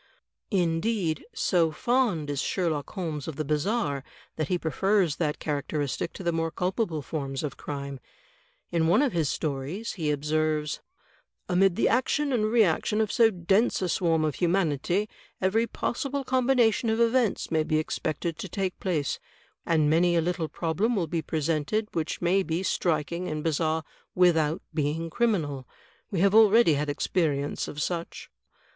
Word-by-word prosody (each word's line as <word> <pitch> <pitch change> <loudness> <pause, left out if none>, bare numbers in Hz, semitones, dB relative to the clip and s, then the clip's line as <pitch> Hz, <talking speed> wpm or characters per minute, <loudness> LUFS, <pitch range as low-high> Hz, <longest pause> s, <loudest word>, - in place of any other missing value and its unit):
Indeed, 175 -1 0
so 180 - +2
fond 200 - 0
is 140 -1 -1
Sherlock 160 -5 -1
Holmes 160 -7 -4
of 160 - -5
the 155 - -3
bizarre 150 - 0 0.3
that 155 -2 -2
he 180 - +1
prefers 180 +1 +1
that 150 -3 -1
characteristic 145 +1 -2
to - - -8
the 170 - +1
more 165 0 -1
culpable 180 -3 -2
forms 135 -2 -4
of 145 -3 -3
crime. 140 -2 -6 0.7
In 165 -2 +2
one 180 - +4
of 275 - +1
his 160 -5 +1
stories 155 +9 -3
he 160 -6 -2
observes: 150 +1 0 0.7
"Amid 185 -1 +3
the 230 - +2
action 270 +3 +1
and 220 -3 +2
reaction 215 -2 +2
of 220 -2 +1
so 230 -1 +5
dense 195 +4 +1
a - - +1
swarm 165 -2 +1
of 155 - 0
humanity, 175 +2 +1 0.3
every 220 +5 +2
possible 275 +4 -2
combination 250 -3 +2
of 220 +1 +1
events 235 -4 +2
may 160 -1 +3
be 155 0 0
expected 155 +1 -2
to 195 - -5
take 190 +1 -3
place, 160 -7 -1 0.5
and 155 -3 +3
many 170 +3 +3
a 165 - +3
little 170 -1 -2
problem 190 +9 0
wiU 180 -5 0
be 165 +1 -1
presented 160 +7 -1
which 160 +1 -3
may 185 +3 +3
be 175 0 -2
striking 170 0 -1
and 155 0 -3
bizarre 160 0 0 0.3
without 165 -2 +3
being 160 +2 -1
criminal. 155 - 0 0.4
We 185 -4 -1
have 200 0 +4
already 220 -4 +6
had 145 +1 -1
experience 145 -1 -1
of 145 - -7
such." 170 +2 -4
170 Hz, 155 wpm, -27 LUFS, 155-200 Hz, 0.7 s, already